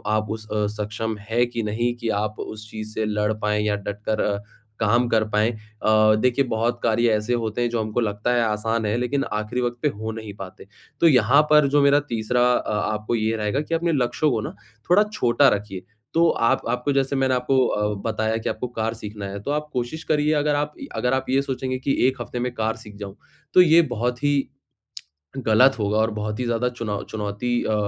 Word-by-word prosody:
आप 110 Hz, 0 st, -1 dB
उस 110 Hz, 0 st, -6 dB
अ, 105 Hz, 0 st, +1 dB, 0.2 s
सक्षम 110 Hz, +1 st, -3 dB
है 120 Hz, +2 st, +3 dB
कि 120 Hz, -1 st, -4 dB
नहीं 115 Hz, +3 st, -1 dB
कि 115 Hz, -2 st, -3 dB
आप 105 Hz, 0 st, -5 dB
उस 110 Hz, 0 st, -7 dB
चीज़ 110 Hz, 0 st, -7 dB
से 110 Hz, -, -1 dB
लड़ 105 Hz, 0 st, 0 dB
पाएँ 105 Hz, 0 st, +1 dB
या 105 Hz, -1 st, +1 dB
डटकर 105 Hz, +1 st, -3 dB
अ, 100 Hz, -1 st, 0 dB, 0.4 s
काम 120 Hz, +3 st, +2 dB
कर 110 Hz, -1 st, +3 dB
पाएँ? 110 Hz, +2 st, +2 dB, 0.3 s
अ, 110 Hz, 0 st, +5 dB
देखिए 125 Hz, +3 st, +2 dB
बहुत 120 Hz, +1 st, -1 dB
कार्य 115 Hz, +1 st, +3 dB
ऐसे 105 Hz, +3 st, -1 dB
होते 110 Hz, +2 st, -2 dB
हैं 120 Hz, -, +1 dB
जो 115 Hz, -1 st, -1 dB
हमको 110 Hz, +2 st, -2 dB
लगता 105 Hz, +1 st, -1 dB
है 120 Hz, -, +2 dB
आसान 110 Hz, +1 st, -1 dB
है 105 Hz, +2 st, 0 dB
लेकिन 135 Hz, +3 st, 0 dB
आखिरी 105 Hz, +4 st, -2 dB
वक़्त 120 Hz, 0 st, -2 dB
पे 150 Hz, -, +2 dB
हो 110 Hz, -2 st, -5 dB
नहीं 110 Hz, -2 st, -7 dB
पाते। 95 Hz, 0 st, -10 dB, 0.3 s
तो 170 Hz, -, +5 dB
यहाँ 130 Hz, 0 st, +5 dB
पर 150 Hz, -2 st, +6 dB
जो 145 Hz, +1 st, +3 dB
मेरा 140 Hz, +1 st, +5 dB
तीसरा 115 Hz, +2 st, 0 dB
अ, 110 Hz, -, -1 dB, 0.2 s
आपको 105 Hz, +2 st, -2 dB
ये 110 Hz, 0 st, 0 dB
रहेगा 105 Hz, +7 st, -1 dB
कि 165 Hz, -, -5 dB
अपने 170 Hz, +1 st, 0 dB
लक्ष्य 135 Hz, +2 st, +1 dB
को 115 Hz, -5 st, 0 dB
ना 110 Hz, -, -6 dB, 0.3 s
थोड़ा 190 Hz, +4 st, +6 dB
छोटा 125 Hz, -, +3 dB
रखिए। 100 Hz, -3 st, -3 dB, 0.3 s
तो 170 Hz, +1 st, +4 dB
आप 115 Hz, -, +2 dB
आपको 125 Hz, +3 st, 0 dB
जैसे 135 Hz, 0 st, +1 dB
मैंने 135 Hz, -1 st, +2 dB
आपको 130 Hz, +1 st, +2 dB
अ, 105 Hz, 0 st, 0 dB
बताया 110 Hz, 0 st, -1 dB
कि 115 Hz, -, -3 dB
आपको 115 Hz, +3 st, -3 dB
कार 115 Hz, -2 st, -2 dB
सीखना 105 Hz, -2 st, -7 dB
है, 100 Hz, +1 st, -5 dB
तो 140 Hz, -, -3 dB
आप 150 Hz, +1 st, -2 dB
कोशिश 125 Hz, +6 st, -3 dB
करिए 150 Hz, 0 st, +2 dB
अगर 145 Hz, 0 st, +1 dB
आप 145 Hz, +1 st, -1 dB
य 275 Hz, -, -6 dB
अगर 125 Hz, +1 st, 0 dB
आप 130 Hz, 0 st, 0 dB
ये 135 Hz, +1 st, +3 dB
सोचेंगे 130 Hz, -1 st, -3 dB
कि 135 Hz, +1 st, 0 dB
1 130 Hz, -2 st, -2 dB
हफ़्ते 120 Hz, -, -5 dB
में 125 Hz, +1 st, -1 dB
कार 110 Hz, -1 st, -1 dB
सीख 105 Hz, -2 st, -12 dB
जाऊँ, 100 Hz, -1 st, -8 dB, 0.4 s
तो 185 Hz, -, +8 dB
ये 170 Hz, -1 st, +6 dB
बहुत 125 Hz, -2 st, -2 dB
ही 145 Hz, 0 st, +3 dB, 1.1 s
गलत 125 Hz, +5 st, +5 dB
होगा 105 Hz, 0 st, 0 dB
और 110 Hz, 0 st, +2 dB
बहुत 105 Hz, +1 st, -4 dB
ही 125 Hz, -, -1 dB
ज़्यादा 120 Hz, +1 st, 0 dB
चुनौ 110 Hz, -4 st, -4 dB
चुनौती 110 Hz, +3 st, -2 dB
अ, 110 Hz, -, 0 dB
115 Hz, 220 wpm, -23 LUFS, 110-130 Hz, 1.1 s, तो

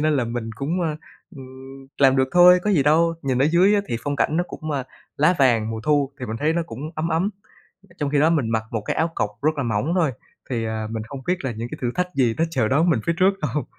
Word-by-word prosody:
nên 155 Hz, -1 st, +2 dB
là 125 Hz, -, +1 dB
mình 115 Hz, -1 st, -4 dB
cũng, 165 Hz, +8 st, -2 dB
ờ, 155 Hz, -2 st, -2 dB, 0.4 s
ừm, 135 Hz, 0 st, -12 dB
làm 135 Hz, -1 st, +5 dB
được 130 Hz, 0 st, +2 dB
thôi 180 Hz, 0 st, +7 dB
có 210 Hz, -, +1 dB
gì 155 Hz, -8 st, +3 dB
đâu. 165 Hz, +3 st, +3 dB
Nhìn 130 Hz, -3 st, 0 dB
ở 135 Hz, -, +3 dB
dưới 180 Hz, +6 st, +4 dB
á 205 Hz, -, +3 dB
thì 115 Hz, -, -1 dB
phong 145 Hz, 0 st, -2 dB
cảnh 155 Hz, -, +1 dB
nó 175 Hz, -, +1 dB
cũng, 155 Hz, 0 st, -7 dB
ơ, 140 Hz, -3 st, -1 dB, 0.3 s
lá 155 Hz, +5 st, +3 dB
vàng, 115 Hz, -5 st, +3 dB
mùa 110 Hz, -1 st, -4 dB
thu 145 Hz, 0 st, +1 dB
thì 125 Hz, -, -4 dB
mình 110 Hz, -, -4 dB
thấy 155 Hz, +2 st, +2 dB
nó 170 Hz, 0 st, 0 dB
cũng 115 Hz, +3 st, -9 dB
ấm 155 Hz, +2 st, -2 dB
ấm 170 Hz, +6 st, 0 dB, 0.7 s
trong 145 Hz, -2 st, -1 dB
khi 145 Hz, -, +1 dB
đó 155 Hz, +3 st, +4 dB
mình 140 Hz, -9 st, 0 dB
mặc 110 Hz, -1 st, 0 dB
một 110 Hz, -, -2 dB
cái -, -, -3 dB
áo 160 Hz, +1 st, +1 dB
cộc 105 Hz, -, -1 dB
rất 155 Hz, +1 st, +2 dB
là 140 Hz, -, -1 dB
mỏng 115 Hz, +8 st, -1 dB
thôi, 160 Hz, -7 st, +2 dB, 0.4 s
thì, 115 Hz, -3 st, -1 dB
à, 110 Hz, 0 st, -3 dB
mình 110 Hz, -1 st, -4 dB
không 140 Hz, -2 st, -7 dB
biết 180 Hz, -, +1 dB
là 125 Hz, -, -1 dB
những 115 Hz, +2 st, -6 dB
cái -, -, -7 dB
thử 120 Hz, -, 0 dB
thách 180 Hz, 0 st, -2 dB
gì 120 Hz, -4 st, +2 dB
nó 165 Hz, -, +3 dB
chờ 125 Hz, -9 st, 0 dB
đón 160 Hz, +6 st, +3 dB
mình 125 Hz, -, +1 dB
phía 170 Hz, -, +2 dB
trước 195 Hz, +1 st, +3 dB
đâu. 150 Hz, 0 st, -1 dB
140 Hz, 280 wpm, -22 LUFS, 120-165 Hz, 0.7 s, thôi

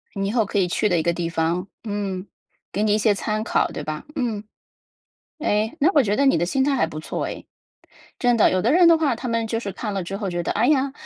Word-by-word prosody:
你 195 Hz, 0 st, -1 dB
以 200 Hz, -, -1 dB
后 225 Hz, -3 st, +2 dB
可 205 Hz, -, -3 dB
以 185 Hz, -2 st, +3 dB
去 210 Hz, +4 st, 0 dB
的 175 Hz, -, +2 dB
一 160 Hz, -, 0 dB
个 170 Hz, -, +1 dB
地 170 Hz, -1 st, -3 dB
方， 170 Hz, +3 st, -1 dB, 0.2 s
嗯， 200 Hz, -3 st, -4 dB, 0.4 s
给 205 Hz, -, -2 dB
你 210 Hz, -1 st, +3 dB
一 -, -, +3 dB
些 215 Hz, 0 st, +3 dB
参 215 Hz, +1 st, -2 dB
考， -, -, +1 dB
对 150 Hz, -, -6 dB
吧？ 155 Hz, -, -5 dB
嗯。 230 Hz, -6 st, -2 dB, 1.0 s
哎， 220 Hz, -3 st, 0 dB
那 315 Hz, +6 st, +5 dB
我 290 Hz, -, +6 dB
觉 205 Hz, -3 st, 0 dB
得 280 Hz, -, +2 dB
你 270 Hz, -, +4 dB
的 175 Hz, -, 0 dB
心 265 Hz, +8 st, +1 dB
态 285 Hz, 0 st, +2 dB
还 165 Hz, -, +2 dB
不 155 Hz, -1 st, -7 dB
错 -, -, -4 dB
哎。 -, -, -7 dB, 0.8 s
真 245 Hz, -1 st, +3 dB
的， 225 Hz, -, +4 dB
有 185 Hz, -, +1 dB
的 235 Hz, +7 st, +2 dB
人 350 Hz, -1 st, +6 dB
的 335 Hz, -, +6 dB
话， 300 Hz, -7 st, +1 dB
他 250 Hz, -, -6 dB
们 230 Hz, -1 st, -1 dB
就 225 Hz, 0 st, -1 dB
是 200 Hz, -4 st, -5 dB
看 210 Hz, +1 st, -5 dB
了 195 Hz, -2 st, -2 dB
之 195 Hz, +3 st, -5 dB
后 200 Hz, -3 st, -3 dB
觉 175 Hz, -1 st, -2 dB
得： -, -, -1 dB
“哎 225 Hz, +4 st, +1 dB
呀， 275 Hz, -2 st, +2 dB
210 Hz, 290 characters per minute, -23 LUFS, 185-245 Hz, 1.0 s, 我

